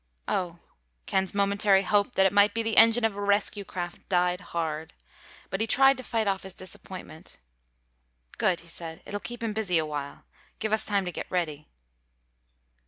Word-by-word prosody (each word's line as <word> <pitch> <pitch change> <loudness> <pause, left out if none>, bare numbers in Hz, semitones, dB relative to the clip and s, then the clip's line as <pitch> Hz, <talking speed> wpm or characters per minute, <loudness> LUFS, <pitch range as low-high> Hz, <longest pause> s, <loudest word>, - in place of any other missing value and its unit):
"Oh." 175 -2 -1 0.5
Ken's 190 0 -1
momentary 200 0 +3
hope 205 +4 +2
that 190 - +4
it 190 - +3
might 205 +1 +5
be 230 - 0
the 225 0 -1
engine 230 +1 +6
of 220 -3 0
a 205 - -5
rescue 205 0 +1
craft 175 -2 -7
died 180 0 +1
hard. 160 -3 -4 0.6
But 195 - -2
he 225 - 0
tried 270 +4 +5
to 255 - -7
fight 225 -3 -1
off 195 -1 0
his 190 -1 -10
disappointment. 185 -3 -10 1.0
"Good," 180 -2 +2
he 170 - -16
said. 165 -1 -7
"It'll 205 - -4
keep 240 +2 -7
him 225 -2 -1
busy 205 -5 0
awhile. 150 -3 -4 0.3
Give 215 -1 -2
us 220 0 +2
time 200 -2 +1
to 180 - -3
get - - -6
ready." 155 -5 -2
195 Hz, 175 wpm, -27 LUFS, 175-215 Hz, 1.0 s, engine